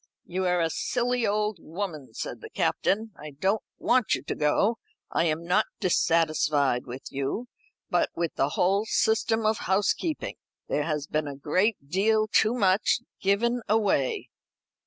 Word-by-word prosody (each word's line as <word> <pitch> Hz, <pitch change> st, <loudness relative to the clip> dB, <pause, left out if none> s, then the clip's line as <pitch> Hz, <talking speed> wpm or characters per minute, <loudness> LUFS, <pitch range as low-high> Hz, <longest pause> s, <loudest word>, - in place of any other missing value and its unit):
"You 185 Hz, +1 st, -2 dB
are 180 Hz, 0 st, +2 dB
a 165 Hz, -1 st, +1 dB
silly 245 Hz, +2 st, 0 dB
old 210 Hz, -2 st, 0 dB
woman," 155 Hz, -, -6 dB
said -, -, -5 dB
the -, -, -9 dB
Captain. 220 Hz, +3 st, 0 dB
"I 150 Hz, 0 st, -10 dB
don't 195 Hz, +5 st, +1 dB, 0.2 s
want 250 Hz, -3 st, +2 dB
you -, -, -7 dB
to -, -, -3 dB
go. 200 Hz, +10 st, +1 dB, 0.3 s
I -, -, +2 dB
am 160 Hz, +1 st, -1 dB
not 185 Hz, +5 st, +2 dB
dissatisfied 155 Hz, -, +2 dB
with 125 Hz, +2 st, -7 dB
you, 140 Hz, -, -3 dB, 0.4 s
but -, -, +2 dB
with 170 Hz, -1 st, -1 dB
the 135 Hz, -, +1 dB
whole 195 Hz, +4 st, +2 dB
system 225 Hz, 0 st, +1 dB
of 215 Hz, 0 st, +2 dB
housekeeping. 205 Hz, -, 0 dB, 0.3 s
There 145 Hz, -, 0 dB
has 150 Hz, -3 st, -2 dB
been 155 Hz, 0 st, -1 dB
a 140 Hz, -, -5 dB
great 170 Hz, +4 st, 0 dB
deal 215 Hz, +7 st, +2 dB
too 220 Hz, +2 st, +3 dB
much 200 Hz, +1 st, +2 dB, 0.2 s
given 235 Hz, +5 st, +2 dB
away." 205 Hz, -11 st, +1 dB
190 Hz, 155 wpm, -27 LUFS, 155-220 Hz, 0.4 s, too